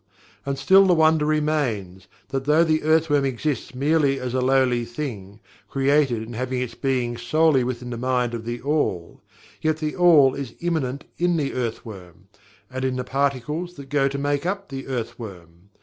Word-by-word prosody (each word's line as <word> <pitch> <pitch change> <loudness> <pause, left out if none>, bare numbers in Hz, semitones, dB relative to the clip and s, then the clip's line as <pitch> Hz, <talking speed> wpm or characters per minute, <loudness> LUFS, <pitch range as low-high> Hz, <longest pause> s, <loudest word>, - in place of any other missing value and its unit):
And 140 0 -1
still 195 +5 +5
the 180 - +4
wonder 160 -1 +3
remains, 125 - -1 0.2
that 135 -1 -3
though 150 +3 +4
the 155 -1 +1
earth 160 +1 +3
worm 145 -2 +2
exists 135 0 -2
merely 140 0 +2
as 125 -1 -4
a 130 - +1
lowly 130 -2 +2
thing, 115 -5 -6 0.3
created 135 -4 +2
and 115 +1 -8
having 130 +1 -2
its 125 -2 -3
being 125 -3 -1
solely 145 +3 +2
within 125 0 -4
the 120 - -4
Mind 125 -1 0
of 115 -1 -4
THE 120 +1 -4
ALL 140 - -1 0.4
yet 155 -1 +1
THE 155 -1 -3
ALL 160 -7 +6
is 135 -5 -6
immanent 145 -6 -2 0.2
in 175 0 +2
the 145 -3 -1
earthworm, 100 -6 -6 0.4
and 130 0 -4
in 130 -1 0
the 125 - -2
particles 140 +6 -2
that 140 -2 -11
go 140 -1 +2
to 140 0 -3
make 145 0 -1
up 195 +2 -3
the 135 -1 -7
earth 120 -2 -4
worm. 90 -4 -11
135 Hz, 180 wpm, -23 LUFS, 120-150 Hz, 0.4 s, ALL